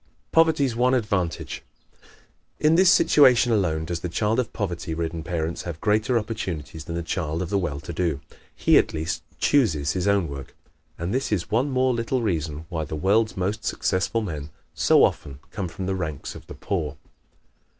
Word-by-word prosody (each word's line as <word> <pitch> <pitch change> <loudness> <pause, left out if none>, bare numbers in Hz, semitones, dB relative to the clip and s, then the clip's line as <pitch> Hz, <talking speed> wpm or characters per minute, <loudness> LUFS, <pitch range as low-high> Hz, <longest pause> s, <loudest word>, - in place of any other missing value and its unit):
Poverty's 155 -6 +3
One 125 +2 +3
Advantage 100 -8 -2 0.4
¶ - - -35 0.6
In 155 +1 +4
this 185 +2 +6
situation 130 -8 +5
alone 85 -7 +1
does 85 +1 -3
the 90 - -4
child 105 +7 0
of 125 - -1
poverty 85 -5 -3
ridden 80 0 -3
parents 85 0 -3
have 85 -3 -6
greater 110 +3 +2
opportunities 90 -9 -4
than 85 - -5
the 85 - -2
child 80 -1 -2
of 90 - -6
the 100 - +2
well 75 -6 -3
to 85 - -7
do. 80 -4 -1 0.4
He - - +5
at - - -1
least 80 +3 -2 0.2
chooses 80 - +2
his 95 +1 -1
own 100 -4 +2
work, 70 -2 -8 0.4
and 85 +4 -3
this 130 -1 -1
is 100 -1 -1
one 125 +6 +2
more 130 -1 +2
little 120 +1 -1
reason 80 -6 -2
why 80 -2 -2
the 75 - -5
world's 105 +8 +2
most 100 +4 -2
successful 100 +3 0
men 75 -6 -5 0.2
so - - +4
often 70 -2 0
come 100 -3 -3
from 90 +2 -6
the 95 - -1
ranks 80 -6 -4
of - - -12
the - - -9
poor. 75 -7 -3
95 Hz, 185 wpm, -24 LUFS, 80-115 Hz, 0.6 s, this